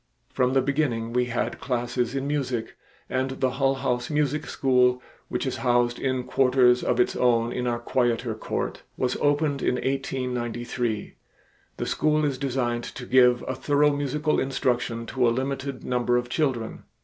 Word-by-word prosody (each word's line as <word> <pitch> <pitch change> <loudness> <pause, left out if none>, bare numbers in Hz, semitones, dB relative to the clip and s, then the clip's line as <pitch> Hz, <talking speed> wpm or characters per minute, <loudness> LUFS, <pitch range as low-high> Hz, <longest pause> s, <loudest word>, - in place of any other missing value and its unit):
From 125 -1 +2
the 135 -1 +3
beginning 130 -5 -1
we 125 0 +2
had 120 -1 -2
classes 125 0 -1
in 135 0 -1
music, 130 -6 -2 0.3
and 130 +1 -2
the 130 -1 +2
Hull 135 0 +1
House 125 -2 -1
Music 150 0 0
School, 125 -2 +3 0.3
which - - -2
is - - -2
housed 120 -1 +1
in 130 -2 -1
quarters 125 -1 +3
of 125 - +1
its 125 - +2
own 120 -1 +2
in 125 0 -2
our 120 -1 0
quieter 120 -1 0
court, 110 - -4 0.2
was 125 0 0
opened 145 -1 +1
in - - +1
1893. 125 -4 -2 0.6
The - - -2
school 155 0 +1
is 140 -3 -1
designed 125 -4 -1
to 125 - -8
give 125 -1 +4
a 130 - -1
thorough 145 +2 +2
musical 145 +2 0
instruction 120 -3 -1
to 125 0 +1
a - - +5
limited 135 +2 -3
number 125 -1 +1
of 120 0 -2
children. 125 -6 -1
125 Hz, 160 wpm, -25 LUFS, 120-135 Hz, 0.6 s, a